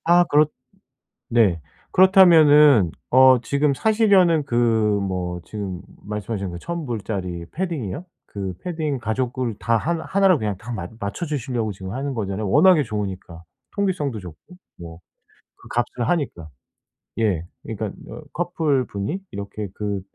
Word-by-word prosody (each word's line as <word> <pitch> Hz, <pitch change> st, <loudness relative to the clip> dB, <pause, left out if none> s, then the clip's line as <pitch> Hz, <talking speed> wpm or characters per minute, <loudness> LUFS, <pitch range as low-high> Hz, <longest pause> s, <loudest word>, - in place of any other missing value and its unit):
아 175 Hz, +1 st, +5 dB
그렇 150 Hz, -2 st, +4 dB, 0.8 s
네 105 Hz, -8 st, +3 dB, 0.3 s
그렇다면은 155 Hz, -, +6 dB, 0.2 s
어 130 Hz, 0 st, +7 dB
지금 140 Hz, +1 st, +1 dB
사시려는 195 Hz, -, +3 dB
그 120 Hz, -4 st, -3 dB, 0.5 s
뭐 90 Hz, -2 st, -3 dB
지금 100 Hz, -4 st, -6 dB, 0.2 s
말씀하신 105 Hz, -1 st, -4 dB
그 85 Hz, -, -7 dB
1,000 170 Hz, -, -5 dB
불짜리 95 Hz, -7 st, -4 dB
패딩이요. 160 Hz, -, -4 dB, 0.2 s
그 95 Hz, -2 st, -5 dB
패딩 155 Hz, -6 st, -2 dB
가족을 120 Hz, +1 st, -2 dB
다 115 Hz, -1 st, +1 dB
하 155 Hz, +10 st, -1 dB
1 195 Hz, 0 st, +2 dB
로 180 Hz, -, +4 dB
그냥 105 Hz, -5 st, -2 dB
다 115 Hz, +5 st, -8 dB
맞 90 Hz, -6 st, -5 dB
맞춰 100 Hz, -, -4 dB
주시려고 125 Hz, -7 st, -2 dB
지금 95 Hz, 0 st, -8 dB
하는 135 Hz, +1 st, -3 dB
거잖아요. 105 Hz, -2 st, -3 dB
워낙에 185 Hz, -, +6 dB
좋으니까. 95 Hz, -7 st, -5 dB, 0.3 s
통기성도 175 Hz, -, -1 dB
좋고 90 Hz, -, -13 dB, 0.2 s
뭐 85 Hz, -1 st, -10 dB, 0.6 s
그 -, -, -14 dB
값을 120 Hz, 0 st, -2 dB
하니까. 125 Hz, -, -2 dB, 0.7 s
예. 90 Hz, -7 st, 0 dB, 0.2 s
그러니까 110 Hz, -2 st, -5 dB, 0.2 s
어 -, -, -8 dB
커플 160 Hz, -6 st, 0 dB
분이 100 Hz, -, -4 dB
이렇게 100 Hz, +1 st, -6 dB
그 100 Hz, -1 st, -3 dB
120 Hz, 275 characters per minute, -22 LUFS, 100-155 Hz, 0.8 s, 어